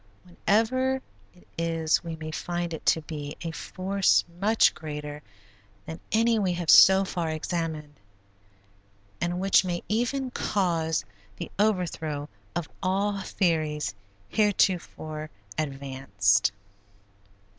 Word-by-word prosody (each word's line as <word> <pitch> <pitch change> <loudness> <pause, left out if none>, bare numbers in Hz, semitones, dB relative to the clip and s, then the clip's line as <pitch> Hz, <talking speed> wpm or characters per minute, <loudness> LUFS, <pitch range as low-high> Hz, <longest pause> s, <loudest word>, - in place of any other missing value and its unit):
Whenever 230 +9 +1 0.3
it 180 - -22
is 165 -1 +1
we 165 -1 -5
may 155 0 -6
find 175 +1 -3
it 160 - -6
to 160 - +4
be 150 -1 -6
a 165 - -3
force 190 +4 +1
much 215 +3 +4
greater 150 -1 -6 0.6
than 160 - -7
any 225 0 +3
we 190 -3 +1
have 175 -2 +2
so 190 0 +8
far 170 -3 -2
examined, 155 -2 -3 1.2
and 175 +1 -1
which 195 0 +4
may 175 -2 -3
even 245 +4 -1
cause 170 -8 0 0.3
the - - -7
overthrow 165 -8 0 0.3
of 175 -2 -2
all 195 +2 0
theories 155 - 0 0.4
heretofore 175 -7 0 0.3
advanced. 130 - +1
170 Hz, 110 wpm, -27 LUFS, 155-195 Hz, 1.2 s, so